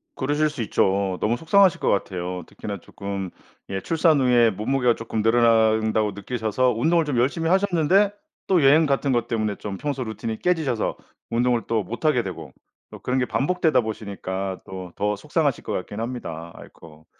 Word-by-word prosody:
그러실 145 +3 +1
수 145 -4 -6
있죠. 95 -2 +1
너무 115 +3 +1
속상하실 190 +4 +4
것 - - 0
같아요. 90 -2 -2
특히나 100 -3 -7
쪼끔 100 0 -6 0.4
예 95 0 -2
출산 160 -2 +2
후에 120 -3 +4
몸무게가 120 +4 +1
쪼끔 115 -1 -3
늘어난다고 110 -2 +3
느끼셔서 115 +4 -1
운동을 160 +7 +2
좀 145 -5 -2
열심히 155 +7 +1
하셨는데 190 +1 +3 0.4
또 180 -5 +3
여행 150 +4 +6
같은 140 -1 +1
것 120 -2 0
때문에 110 -3 -1
좀 100 -1 -6
평소 140 -1 -3
루틴이 110 0 -5
깨지셔서 155 -11 0 0.3
운동을 120 0 +1
또 115 -2 0
못 120 - -7
하게 135 -7 +3
되고 80 -7 -7 0.4
또 - - -10
그런 130 +1 -1
게 125 - +1
반복되다 160 +1 +1
보시니까 100 -3 -5
또 95 -2 -8
더 105 0 0
속상하실 100 - -1
것 - - -5
같긴 105 - -5
합니다. 85 -9 -6
아이코. 80 -1 -15
115 Hz, 375 characters per minute, -23 LUFS, 100-145 Hz, 0.4 s, 여행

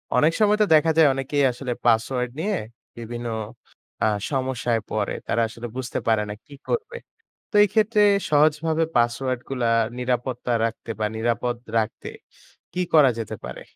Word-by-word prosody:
অনেক 155 +2 +4
সময় 210 -1 +4
তো - - +6
দেখা 160 +1 +4
যায়, 160 - +7
অনেকেই 135 +2 -1
আসলে 125 0 -4
পাসওয়ার্ড 120 +2 +2
নিয়ে 200 +3 0 0.4
বিভিন্ন 120 +1 -6 0.8
আ - - +4 0.2
সমস্যায় 130 -3 0
পড়ে। 105 -2 -1
তারা 115 - +1
আসলে 115 +1 -8
বুঝতে 130 -1 -3
পারে 110 -2 +3
না - - -3
কি 145 - -15 0.2
করবে? 475 0 -2 0.5
তো, - - -29
এই - - 0
ক্ষেত্রে 215 0 +2 0.3
সহজভাবে 155 +2 +3
পাসওয়ার্ডগুলা 120 +1 0 0.3
নিরাপত্তা 125 0 -2
রাখতে 115 0 -4
বা 105 - +2
নিরাপদ 120 +2 -1 0.2
রাখতে 110 0 -3 0.6
কি 180 - -1
করা 145 -4 +7
যেতে 110 -1 -5
পারে? 65 - -7
125 Hz, 150 wpm, -23 LUFS, 120-155 Hz, 0.8 s, যায়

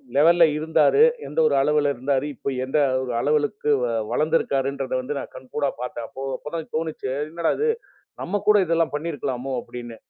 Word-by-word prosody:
லெவல்ல 165 +4 +6
இருந்தாரு, 160 - +4 0.2
எந்த - - -3
ஒரு - - +2
அளவுல 150 -1 +2
இருந்தாரு, 130 +2 0
இப்ப 140 - -3
எந்த 135 +3 -1 0.4
அளவுக்கு 150 +2 +1 0.4
வளர்ந்து 155 +6 +2
இருக்காருன்றத 135 0 -2
வந்து 140 +3 -4
நான் - - -8
கண்கூடா 135 +2 -2
பாத்ததேன், 120 -2 -5
அப்போ 135 - -8
அப்பதான் 160 +1 -6
தோணுச்சு. 160 -4 -4 0.2
என்னடா 165 +1 0
இது 455 +1 +2 0.5
நம்ம 205 +4 -2
கூட 210 - +7
இதெல்லாம் 165 -2 +1
பண்ணி 165 +3 -3
இருக்கலாமோ, 135 -1 -3
அப்படின்னு. 120 -2 -9
145 Hz, 155 wpm, -23 LUFS, 135-165 Hz, 0.5 s, கூட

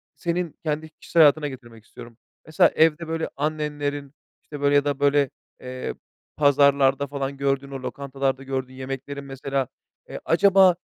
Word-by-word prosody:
senin 170 +2 -2
kendi 155 0 -2
kişisel 165 +1 +1
hayatına 150 0 +5
getirmek 120 -5 -11
istiyorum. 115 -1 -13 0.3
Mesela 155 - +4
evde, 160 +1 +3
böyle, 160 0 -2
annenlerin, 145 -1 -3 0.3
işte, 145 -2 -9
böyle, 145 0 +3
ya 145 0 +4
da, 145 -1 -1
böyle, 140 -1 +3 0.3
ııı, 130 0 -5 0.4
pazarlarda 140 -1 +4
falan 140 0 -4
gördüğün, 140 0 -1
o 135 -1 -6
lokantalarda 135 0 -3
gördüğün 130 -1 -4
yemeklerin 135 +2 -6
mesela, 135 -1 -3 0.4
ııı, - - -6
acaba, 190 +1 +5
140 Hz, 145 wpm, -24 LUFS, 135-150 Hz, 0.4 s, hayatına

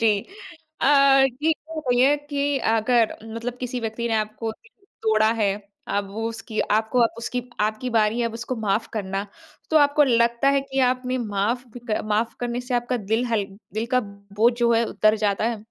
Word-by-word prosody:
जी। 215 -3 +3 0.6
अ, 275 -1 +6 0.2
जी 315 - +2
ये 320 - +4 0.2
बताइए 265 -1 +3
कि 285 0 0
अगर 225 0 +2
मतलब 230 +2 -6
किसी 250 0 -3
व्यक्ति 230 +1 -3
ने 225 - 0
आपको 215 +1 -2
दिल 415 - -25 0.2
तोड़ा 220 0 +3
है, 200 -2 +3 0.4
अब 200 -1 -1
वो 225 +2 -2
उसकी 225 -1 -4
आपको 220 +3 +1
आप 230 - +1
उसकी 245 +2 -3 0.2
आपकी 215 +4 -1
बारी 225 0 +2
है, 235 - +1
अब 230 - -5
उसको 235 +2 -4
माफ़ 220 0 -1
करना। 195 -2 -3 0.4
तो 315 - +3
आपको 290 0 +5
लगता 235 0 +2
है - - +3
कि 270 0 -5
आपने 255 0 -2
माफ़ 225 +2 -1 0.4
माफ़ 215 +2 0
करने 240 0 -2
से 250 0 -4
आपका 245 +1 0
दिल 225 +3 +2
हल्क 205 -4 -2 0.2
दिल 220 +2 -1
का 250 - +5
बोझ 200 +2 0
जो 235 -1 +3
है, 230 0 +3
उतर 215 -1 +2
जाता 200 +1 0
है? 230 -3 -4
230 Hz, 185 wpm, -23 LUFS, 215-250 Hz, 0.6 s, अ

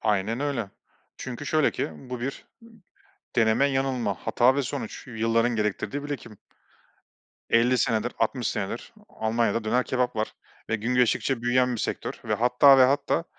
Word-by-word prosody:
Aynen 110 +3 0
öyle. 130 -8 -2 0.5
Çünkü 130 +3 -7
şöyle 155 -2 +3
ki - - -3 0.2
bu 125 -1 -4
bir, 135 +2 -5 0.2
ımm, - - -15 0.7
deneme 115 +4 +4
yanılma, 130 -6 0
hata 125 +2 +4
ve 140 - +1
sonuç, 125 -3 -6
yılların 115 0 +1
gerektirdiği 105 +7 -2
birikim. 135 -8 -7 1.1
50 120 +2 +4
senedir, 115 0 0
60 120 +2 0
senedir 105 - -4 0.2
Almanya'da 115 0 -1
döner 125 +3 +1
kebap 125 -2 -1
var 110 0 -2 0.4
ve 115 - +1
gün 115 +4 -2
geçtikçe 125 0 +1
büyüyen 125 +1 +2
bir 110 - -4
sektör - - -4
ve 110 - 0
hatta 125 +4 +6
ve 130 - +8
hatta 145 +5 +1
120 Hz, 150 wpm, -26 LUFS, 110-130 Hz, 1.1 s, ve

